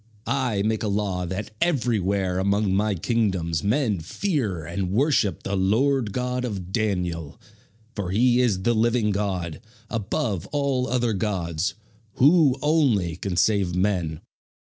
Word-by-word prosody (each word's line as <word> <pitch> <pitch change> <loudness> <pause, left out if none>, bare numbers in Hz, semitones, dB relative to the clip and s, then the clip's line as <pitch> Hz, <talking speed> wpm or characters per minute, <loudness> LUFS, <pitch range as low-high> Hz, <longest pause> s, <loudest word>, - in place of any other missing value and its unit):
I 125 -8 0
make 110 0 0
a 110 - -1
law 100 -3 -1
that 95 +4 -4
everywhere 100 - +1
among 100 +1 +1
my 105 +1 +1
kingdoms 95 -5 0
men 110 - +1
fear 100 - -2
and 90 +2 -3
worship 110 - +1
the 100 - -2
Lord 110 +5 +2
God 125 +2 -2
of 95 -7 -5
Daniel; 90 -8 -2 0.6
for 100 -4 -3
he 120 +5 +3
is 100 -7 +1
the 120 - +3
living 115 -1 +2
God, 95 -6 -2 0.3
above 105 -3 -2
all 140 -3 0
other 120 -2 0
gods, 90 -4 -2 0.4
who 145 - +5
only 130 - +2
can 90 0 -4
save 95 -2 +2
men." 90 -5 0
105 Hz, 135 wpm, -24 LUFS, 95-120 Hz, 0.6 s, who